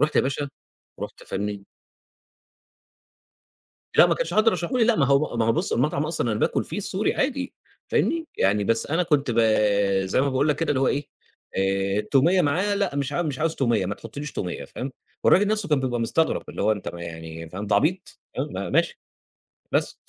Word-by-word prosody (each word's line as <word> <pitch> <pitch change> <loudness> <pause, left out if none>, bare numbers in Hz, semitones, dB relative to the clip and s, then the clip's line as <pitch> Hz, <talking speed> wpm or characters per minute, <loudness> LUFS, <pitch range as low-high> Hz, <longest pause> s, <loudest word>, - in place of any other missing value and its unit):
رُحت 150 +1 +2
يا - - +7
باشا 140 +1 -2 0.5
رُحت - - -7
فاهمني 100 0 -4 2.3
لأ - - +8
ما - - +2
كانش - - -2
حد 215 +1 +5
رشحه 180 +2 -1
لي 230 - +5
لأ 235 -1 +3
ما 140 - +3
هو 140 -2 +2
ما 115 - +2
هو 115 - +3
بُص - - 0
المطعم 145 +3 +1
أصلًا 120 -8 +1
أنا 105 - -2
باكل - - +1
فيه - - -4
السوري 200 +1 -1
عادي، 270 0 -1 0.4
فاهمني، 330 0 +1
يعني 100 +2 +2
بس 115 +3 +1
أنا 165 +5 +1
كنت 150 -6 +1
ب 115 - 0 0.7
زي 95 - +1
ما 140 - +2
باقول 135 +3 +1
لك 150 - +2
كده 165 - -2
اللي 135 -2 +1
هو 135 - +3
إيه 145 +1 -1 0.5
آآ، 95 +1 +1
التومية 145 - +3
معاه 185 +8 +1
لأ 200 -8 -1
مش 140 0 -1
ع 175 - 0
مش 145 -5 -3
عاوز 160 +1 0
تومية 120 -8 +1
ما 100 - -2
تحطليش 140 +7 -8
تومية 90 -2 -4
فاهم، 130 +1 -6 0.3
والراجل 205 +3 +5
نفسْه 215 -4 0
كان 150 -3 +2
بيبقى 125 -2 -1
مستغرب 160 +8 +1
اللي - - -4
هو 110 +1 +3
أنت 100 -3 -5
م 85 - -8
يعني 80 -1 -8
فاهم 95 +5 -6
أنت 105 - -2
عبيط! 180 +4 +1 0.2
م - - -3
ماشي 475 - +1 0.7
بس. - - 0
140 Hz, 200 wpm, -24 LUFS, 105-170 Hz, 2.3 s, لأ